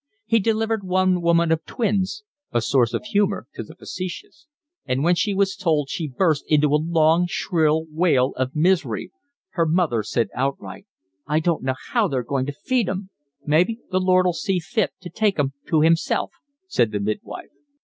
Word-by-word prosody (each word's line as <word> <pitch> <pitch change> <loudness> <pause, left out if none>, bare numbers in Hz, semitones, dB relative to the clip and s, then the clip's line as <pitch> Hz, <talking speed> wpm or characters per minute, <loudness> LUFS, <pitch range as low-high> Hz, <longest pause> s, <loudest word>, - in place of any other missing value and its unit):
He 230 - +3
delivered 225 0 0
one 185 -1 +1
woman 170 -1 +3
of 160 -1 +1
twins 210 - -1 0.3
(a 120 - +2
source 120 +1 +2
of - - -4
humour 205 - 0
to - - -6
the 160 - -11
facetious) 185 - -8 0.4
and 130 +1 -1
when 175 +2 +4
she 200 +3 0
was 195 0 +1
told 155 -8 0
she 160 - -3
burst 150 +2 +1
into 150 -1 +3
a 150 - +3
long, 165 +1 +3
shrill 160 -3 +1
wail 155 -5 +2
of 130 +2 -2
misery. 160 - +1 0.4
Her 165 -2 0
mother 155 -9 +1
said 115 0 -1
outright: 140 +9 -4 0.4
"I 150 +1 +2
don't 165 0 0
know 130 0 -1 0.2
how 230 -4 +3
they're 130 -7 -2
going 130 +1 -2
to - - -2
feed 250 -7 +1
'em." 190 +1 -5 0.3
"Maybe 175 +10 +2
the 185 - +2
Lord'll 185 -1 +3
see 190 +2 -1
fit 185 +5 -1
to 175 -2 -9
take 210 +1 +1
'em 140 -2 0
to 155 -2 +3
'imself," 165 +1 +2 0.4
said 115 - +1
the 105 - -2
midwife. 105 0 -5
170 Hz, 180 wpm, -22 LUFS, 145-190 Hz, 0.4 s, when